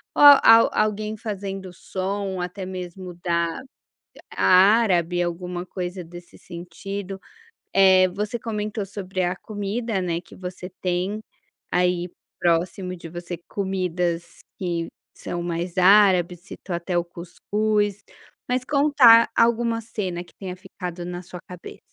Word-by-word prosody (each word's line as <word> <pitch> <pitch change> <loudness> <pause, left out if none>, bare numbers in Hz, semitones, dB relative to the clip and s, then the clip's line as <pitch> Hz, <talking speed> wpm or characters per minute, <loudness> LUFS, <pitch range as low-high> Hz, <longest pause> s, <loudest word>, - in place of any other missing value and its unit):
ou - - +4 0.2
al 225 0 +7
alguém 215 0 0
fazendo 195 -3 -5
som 190 +1 -4
até 180 +2 -5
mesmo 185 0 -7
da 170 +4 0 0.7
árabe 185 -3 +4
alguma 175 +1 -4
coisa 180 -1 -5
desse 175 +1 -13
sentido. 190 +3 -7 0.6
Eh, 190 -1 +6
você 210 +5 -3
comentou 210 -2 -3
sobre 190 -1 -4
a 175 +1 0
comida, 210 0 -3
né, 170 -2 -1
que - - -16
você 180 0 -7
tem 185 +4 -1 0.5
aí 180 0 +1 0.3
próximo 175 +2 0
de 170 -1 -10
você, 175 0 -6
comidas 180 -3 -2 0.2
que 170 -3 -2 0.3
são 175 - -5
mais 175 +1 -4
árabes, 185 -2 +5
citou 190 -1 -7
até 175 +1 -2
o 175 - 0
cuscuz. 205 +4 -2 0.5
Mas 250 0 0
conta 280 -6 +6
a - - +6
alguma 230 0 +1
cena 190 -6 -4
que - - -22
tenha 185 -2 -6
ficado 180 -1 -7
na 180 0 -5
sua 180 0 -10
cabeça. 180 -1 -10
185 Hz, 130 wpm, -23 LUFS, 175-205 Hz, 0.7 s, al